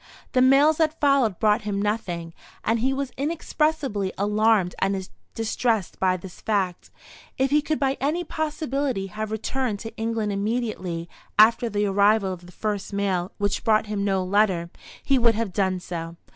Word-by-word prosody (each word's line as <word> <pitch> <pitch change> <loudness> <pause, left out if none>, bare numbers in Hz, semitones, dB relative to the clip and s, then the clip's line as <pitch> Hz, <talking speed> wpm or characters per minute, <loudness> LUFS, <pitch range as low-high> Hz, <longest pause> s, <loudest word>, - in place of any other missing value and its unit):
The 255 - +3
mails 280 +4 +5
that 315 -1 +1
followed 275 - +3
brought 215 +1 +3
him 205 -1 -2
nothing, 180 -6 -2 0.3
and 225 +1 +1
he 260 +4 +1
was 270 -1 -2
inexpressibly 290 - -1
alarmed 210 -2 +2
and 190 -1 -1 0.3
distressed 225 -2 -1
by 185 -1 +2
this 180 0 -11
fact. 195 -5 -1 0.5
If 265 +1 +1
he 300 +1 +4
could 310 +1 -1
by 270 -1 +1
any 310 +6 0
possibility 290 - -2
have 215 0 -3
returned 220 +1 -2
to 225 - -7
England 225 -2 -1
immediately 200 -5 -2 0.3
after 230 +2 +5
the 205 -1 0
arrival 200 0 +3
of 175 -1 -11
the - - -13
first 205 +1 -3
mail 190 -3 -1
which 205 -1 -1
brought 215 -1 +3
him 210 -1 -2
no 195 -2 +1
letter, 185 -3 +1 0.3
he 275 -2 +3
would 230 -2 +4
have 220 -4 -2
done 190 -2 +1
so. 165 -2 -6
215 Hz, 165 wpm, -24 LUFS, 195-260 Hz, 0.5 s, mails